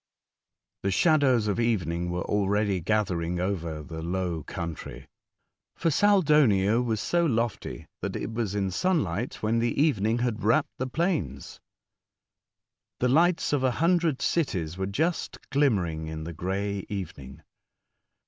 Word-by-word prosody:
The 100 - 0
shadows 130 - +3
of 105 +2 0
evening 90 -7 0
were 90 0 -2
already 100 -1 +1
gathering 90 -3 0
over 85 -5 -2
the 80 +1 -7
low 85 -1 -2
country, 80 -5 -6 0.7
for 165 - 0
Saldonio 145 - +4
was 115 -3 -1
so 175 +9 +1
lofty 115 - -1 0.2
that - - -3
it 115 - -4
was 110 -3 -2
in 95 -2 0
sun 180 - +1
light 100 +7 -4
when 110 +2 +2
the 120 +2 0
evening 115 -7 +2
had 120 -3 -1
wrapt 115 +3 +2
the 130 - -1
plains. 160 - -2 1.4
The 125 - +2
lights 170 +4 +3
of 140 -3 +1
a 130 - +4
hundred 165 -3 +2
cities 90 - 0
were 95 0 -2
just 160 - -1
glim 140 -4 +4
mering 80 -4 -3
in 80 0 -5
the 85 +1 -6
grey 95 +4 -2
evening. 80 -10 -7
105 Hz, 140 wpm, -27 LUFS, 90-135 Hz, 1.4 s, Saldonio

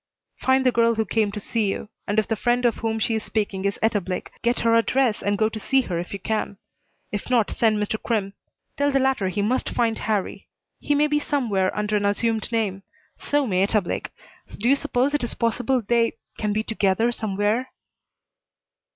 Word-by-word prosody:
"Find 260 0 +2
the 255 - +5
girl 230 -1 +3
who 220 0 0
came 215 +1 +1
to 210 - -5
see 215 +1 -1
you, 195 - -3 0.2
and 205 - -1
if 215 - +3
the 225 - 0
friend 240 +3 +1
of 235 - +2
whom 225 -1 -1
she 225 +1 0
is 220 -1 -1
speaking 200 -3 -2
is 200 - 0
Etta 220 -2 +2
Blake, 185 0 -5
get 240 +1 +1
her 230 0 +3
address 230 0 +2
and 205 0 0
go 215 +1 +3
to 220 0 -5
see 270 +6 +2
her, 180 -8 -3
if 175 - -6
you 200 - -3
can. 205 0 -2 0.5
If 205 +3 -4
not, 235 -4 +2
send 220 -2 +2
Mr. 210 +1 -2
Crimm. 205 -4 -1 0.4
Tell 285 0 +2
the 275 - +2
latter 265 -8 +1
he 200 +2 -1
must 250 +5 0
find 230 -2 0
Harrie. 210 -3 -2 0.3
He 290 - 0
may 295 +1 +4
be 295 0 +1
somewhere 225 -11 0
under 210 0 +1
an 205 - -1
assumed 225 +2 0
name. 210 -4 -1 0.4
So 290 -1 +1
may 185 -5 +1
Etta 210 +2 +3
Blake. 175 - -4 0.5
Do 225 - -1
you 275 - +6
suppose 280 -1 0
it 295 - 0
is 240 - -3
possible 245 +2 0
they 235 0 +2 0.2
can 210 -1 -2
be 215 +1 0
together 220 +1 +1
somewhere?" 215 +3 -1
220 Hz, 210 wpm, -24 LUFS, 205-245 Hz, 0.5 s, you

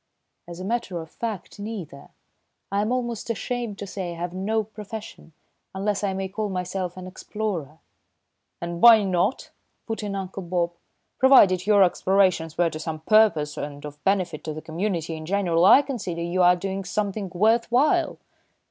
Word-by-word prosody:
"As 170 0 -9
a 185 - -5
matter 210 -5 -2
of 160 -1 -9
fact, 215 -5 -6
neither. 200 -10 -7 0.6
I 200 +1 +1
am 215 +3 -1
almost 240 -3 -2
ashamed 230 -1 -3
to 200 - -6
say 185 -3 -5
I - - -9
have 175 +1 -4
no 215 +4 0
profession, 215 -3 -9 0.4
unless 200 +1 -1
I 200 - +1
may 190 0 -2
call 210 +2 -3
myself 185 -1 -3
an 185 - -7
explorer." 185 -5 -5 0.8
"And 170 0 -5
why 230 -3 +9
not?" 185 +5 0 0.3
put 225 -1 -4
in 205 -1 -4
Uncle 195 0 -5
Bob. 175 -1 -1 0.5
"Provided 205 -9 +6
your 205 -2 +6
explorations 185 -3 +2
were 175 -1 +2
to 155 - -6
some 155 -1 -5
purpose 165 -7 +3
and 145 0 -6
of 145 0 -10
benefit 185 -5 0
to 155 -1 -4
the 155 - -6
community 165 -1 -2
in 155 0 -8
general, 180 -3 +2
I 270 +8 +8
consider 200 -11 -4
you 175 +2 0
are 180 0 +6
doing 195 +2 -4
something 200 0 -2
worth 225 +5 +2
while." 305 +7 +2
190 Hz, 170 wpm, -24 LUFS, 170-215 Hz, 0.8 s, why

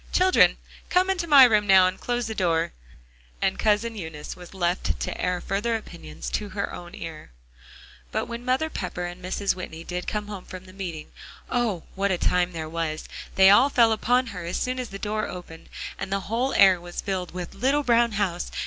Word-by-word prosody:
"Children, 370 0 +5 0.3
come 370 +1 +3
into 355 -3 -2
my 285 -4 +9
room 215 -4 +4
now, 190 -1 +7
and 185 +1 -1
close 245 -1 -1
the 220 - -3
door." 170 -4 0 0.7
And - - 0
Cousin 220 +2 +1
Eunice 160 -6 -7
was 180 -1 -12
left 175 - -1
to - - -4
air 180 0 0
further 205 +6 -1
opinions 80 - -7
to 210 -1 -2
her 200 +1 -3
own 175 0 -9
ear. 160 -2 -8 0.8
But - - -1
when 235 0 -6
Mother 255 +5 +1
Pepper 180 -2 -4
and 175 +1 -8
Mrs. 195 +2 0
Whitney 165 -3 -8
did 180 +1 -5
come 210 -1 -2
home 200 -3 -7
from 185 0 -9
the 185 - -14
meeting, 175 -6 -6 0.4
oh! 230 -9 0
what 200 +1 0
a 185 - +1
time 180 +1 +1
there 160 -2 -5
was. 160 -1 -3 0.3
They 190 0 +7
all 245 +7 +6
fell 235 -4 +4
upon 245 +3 +2
her, 180 -2 -6
as 170 +2 -3
soon 255 0 -2
as 250 - -4
the 195 - -7
door 215 +1 -2
opened, 175 -3 -10 0.3
and 195 0 -5
the 195 0 0
whole 235 +7 -1
air 190 -3 +6
was 175 0 -8
filled 185 -3 -3
with 180 -1 -5
"little 270 +8 +1
brown 235 -2 +3
house." 190 -4 -1
195 Hz, 205 wpm, -25 LUFS, 175-230 Hz, 0.8 s, my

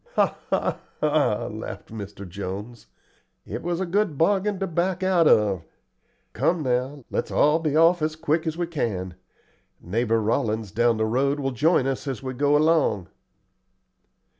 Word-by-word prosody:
"Ha, - - +2
ha, - - 0 0.2
ha!" - - +1
laughed - - -7
Mr. 100 -2 -7
Jones. 100 +5 -7 0.6
"It - - -5
was 175 0 -2
a 190 - 0
good 185 -3 0
bargain 200 +4 +2
to 195 - -1
back 180 +2 -1
out 180 -4 +4
of. 100 -5 +3 0.7
Come 165 -2 +1
now, 130 +1 -1
let's - - -2
all 150 +2 +3
be 155 -3 -1
off 165 +2 +5
as 155 0 -1
quick 160 +1 0
as 160 0 -2
we 175 - 0
can. 105 - -3 0.7
Neighbor 115 +5 0
Rollins 110 -2 -1
down 120 +1 +2
the 110 - +1
road 135 +6 +1
will 135 -1 -1
join 145 +2 +2
us 135 +1 -2
as 130 -4 -4
we 130 0 -4
go 145 +3 +3
along." 150 - +2
140 Hz, 160 wpm, -24 LUFS, 110-165 Hz, 0.7 s, off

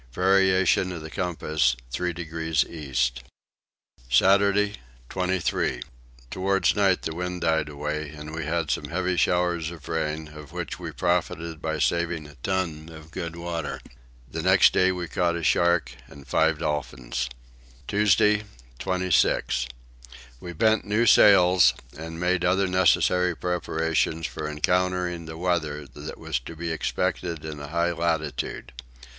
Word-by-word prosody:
Variation 95 +1 +3
of 85 -3 -6
the 80 - -8
compass 80 -7 0 0.2
three 90 +8 -1
degrees 80 -2 -1
east. 60 -6 -2 0.9
Saturday 100 +8 +4 0.3
23. 90 -9 -1 0.5
Towards 95 +1 +1
night 95 -3 +2
the 80 - -3
wind 90 +1 -4
died 80 -2 +1
away 75 +1 -4
and 75 +1 -9
we 80 0 -3
had 80 -1 -1
some - - -1
heavy 95 +1 -1
showers 90 -2 +1
of 80 -4 -11
rain 80 -1 -2
of 75 -1 -12
which - - -5
we - - -5
profited 85 -2 -1
by 80 -1 -2
saving 85 +1 0
a 75 - -12
ton 85 -4 -2
of 80 -1 -12
good 85 -2 -5
water. 85 -2 -4 0.5
The 80 +6 -5
next 95 +1 +5
day 95 0 +4
we 90 -2 -4
caught 85 0 0
a 85 - -4
shark 85 0 +2 0.2
and 70 -1 -14
five 80 +4 +2
dolphins. 65 -5 -3 0.6
Tuesday 105 0 +3 0.4
26. 90 -8 +1 0.7
We 90 - -7
bent 110 +6 +2
new 105 +3 +1
sails 90 - +6 0.2
and 80 +2 -7
made 90 0 +1
other 95 +2 +3
necessary 90 -1 +3
preparations 80 -2 -1
for 75 - -4
encountering 90 +2 0
the 80 0 -7
weather 80 -4 -1
that 75 +3 -8
was - - -2
to 70 +7 -10
be 85 +1 -4
expected 80 0 -2
in 75 -2 -6
a 70 - -7
high 85 +3 0
latitude. 80 -3 -2
85 Hz, 140 wpm, -25 LUFS, 75-90 Hz, 0.9 s, sails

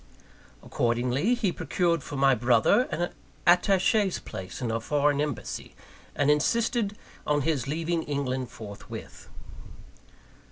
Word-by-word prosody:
Accordingly, 125 - +1
he 220 -6 0
procured 170 -2 0
for 145 - -7
my 135 0 +4
brother 120 - +3
an 175 +2 -2 0.3
attache's 190 +2 +3
place 95 0 -8
in 120 -3 -2
a 115 - 0
foreign 145 +2 +1
embassy, 150 -4 -4 0.4
and 145 0 +3
insisted 215 - +1 0.3
on 150 -1 +2
his 140 -4 0
leaving 165 +3 -1
England 130 -4 -2
forthwith. 100 -2 -10
145 Hz, 115 wpm, -27 LUFS, 125-175 Hz, 0.4 s, my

